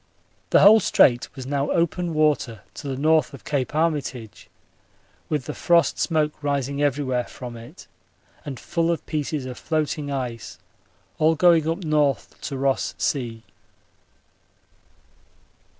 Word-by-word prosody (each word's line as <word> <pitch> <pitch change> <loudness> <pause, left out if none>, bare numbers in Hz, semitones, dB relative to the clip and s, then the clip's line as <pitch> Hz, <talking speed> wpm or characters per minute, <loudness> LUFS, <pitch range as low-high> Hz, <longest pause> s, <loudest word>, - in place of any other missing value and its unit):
The - - +5
whole 215 +2 +8
Strait 120 - +3
was 130 - -7
now 140 +1 -1
open 170 0 0
water 150 -7 +1
to 145 - -8
the 135 - -2
N. 140 +3 -4
of 155 -4 +2
Cape 140 -2 -2
Armitage, 145 -8 -2 0.8
with 150 -5 -1
the - - -5
frost 170 -1 +2
smoke 155 -3 +1
rising 140 -1 -1
everywhere 135 -3 0
from 125 -2 -9
it, 115 0 -12 0.6
and 135 -4 -7
full 165 0 -1
of 170 - -2
pieces 150 -2 -3
of 125 -1 -7
floating 155 -2 -2
ice, 125 -4 -5 0.6
all 160 +1 +4
going 165 -1 +4
up 170 +2 -3
N. 155 - -3 0.5
to 140 - -4
Ross 135 0 0
Sea. 115 -5 -2
145 Hz, 135 wpm, -23 LUFS, 130-160 Hz, 0.8 s, whole